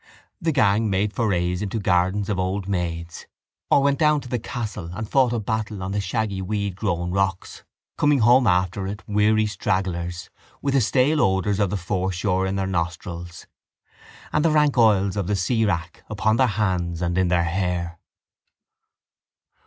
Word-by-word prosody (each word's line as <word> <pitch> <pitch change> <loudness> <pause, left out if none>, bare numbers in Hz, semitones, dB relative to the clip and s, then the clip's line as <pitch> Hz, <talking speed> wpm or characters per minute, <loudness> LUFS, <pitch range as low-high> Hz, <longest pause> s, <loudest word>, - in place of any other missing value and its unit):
The 165 -1 +1
gang 110 -5 +2
made 100 +2 0
forays 90 -4 0
into 105 +2 -3
the 105 - -4
gardens 95 +3 +1
of 100 -3 -1
old 95 +1 -2
maids 85 -3 -4 0.4
or 140 - +4
went 140 0 +2
down 150 -2 +4
to 125 - -10
the 125 0 -2
castle 110 -7 -5
and 110 +3 -5
fought 130 0 +3
a 120 - 0
battle 110 -2 -3
on 95 - -4
the 100 +1 -1
shaggy 100 0 -2
weedgrown 95 -3 -2
rocks, 95 -1 -2 0.4
coming 145 -1 +4
home 120 +1 +5
after 90 +1 +1
it 105 +2 -6
weary 105 +1 +2
stragglers 90 -4 -2 0.3
with 140 -1 -1
the 135 - +4
stale 140 +7 +2
odours 95 +1 +1
of 100 -2 +2
the 105 - -2
foreshore 95 0 -1
in 95 - -2
their 95 -1 -1
nostrils 85 -1 -4 0.9
and 150 - +2
the 165 - +4
rank 150 -2 +3
oils 105 -5 +3
of 100 -4 -2
the 105 - +1
seawrack 95 -4 -1
upon 110 +1 +1
their 130 - +4
hands 90 -6 -1
and 85 0 -1
in 95 0 +2
their 85 -1 +2
hair. 85 -1 -2
100 Hz, 170 wpm, -23 LUFS, 90-110 Hz, 0.9 s, home